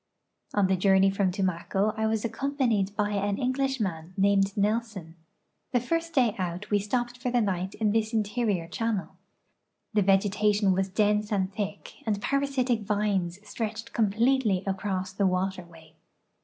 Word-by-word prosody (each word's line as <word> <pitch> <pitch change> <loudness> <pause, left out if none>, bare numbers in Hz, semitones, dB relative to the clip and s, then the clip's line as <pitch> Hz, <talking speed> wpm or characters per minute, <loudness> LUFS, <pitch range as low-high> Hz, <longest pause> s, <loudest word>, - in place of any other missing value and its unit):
On 205 -2 +4
the 190 0 +2
journey 190 +1 +4
from 195 -1 +1
Tumaco 190 +2 0
I 220 0 0
was 220 0 0
accompanied 230 -5 0
by 210 0 0
an 200 0 0
English 265 +1 0
man 175 -3 -4
named 195 0 +2
Nelson. 205 -5 -1 0.6
The 245 - +4
first 330 +6 -2
day 245 -6 +4
out 180 +3 -4
we 205 - +4
stoi)ped 240 +4 -2
for 250 0 -2
the 245 0 +2
night 190 -3 -1
in 215 -1 +1
this 220 0 +1
interior 210 -5 0
channel. 215 +2 -2 0.8
The 210 - +3
vegetation 200 +1 +3
was 190 +1 0
dense 210 +1 +1
and 190 -2 0
thick, 205 -1 -5
and 205 -2 +1
])arasitic 265 -1 0
vines 205 -2 -1
stretched 225 +1 -5
completely 220 -1 +2
across 190 -1 -2
the 195 0 +2
waterway. 180 -4 -3
205 Hz, 150 wpm, -27 LUFS, 190-225 Hz, 0.8 s, On